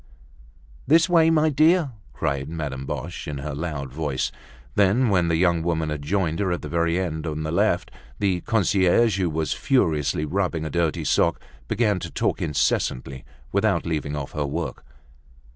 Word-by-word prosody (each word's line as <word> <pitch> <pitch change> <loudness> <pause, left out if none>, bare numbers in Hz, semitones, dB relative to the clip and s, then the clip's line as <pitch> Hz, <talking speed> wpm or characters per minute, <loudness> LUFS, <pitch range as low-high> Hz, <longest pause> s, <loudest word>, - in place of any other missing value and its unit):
"This 165 +4 +5
way, 165 -3 +5
my 155 -1 +3
dear!" 155 +1 +3 0.2
cried 70 0 -2
Madame 70 -5 -5
Boche, 85 0 -5
in 75 -2 -4
her 70 +2 -5
loud 70 -4 -4
voice. 75 -3 -2 0.4
Then, 105 +5 +3
when 90 -4 +2
the 85 - +2
young 85 -1 +2
woman 80 -2 -1
had 75 -1 -3
joined 85 +1 -1
her 95 -3 0
at 85 - -2
the - - -4
very 85 0 +1
end 80 -3 -3
on 75 0 -3
the 80 - -3
left, 85 - +1 0.3
the 95 -3 0
concierge, 100 0 +2
who 90 -3 +1
was 80 0 -1
furiously 80 - +1
rubbing 85 -1 -1
a 80 - -4
dirty 85 -1 0
sock, - - +2 0.3
began 105 - +1
to - - -6
talk - - -1
incessantly, 65 -4 -1 0.3
without 100 -3 +1
leaving 75 -3 -2
off 70 -2 -5
her 75 -1 -2
work. 70 - -4
85 Hz, 170 wpm, -24 LUFS, 75-100 Hz, 0.4 s, This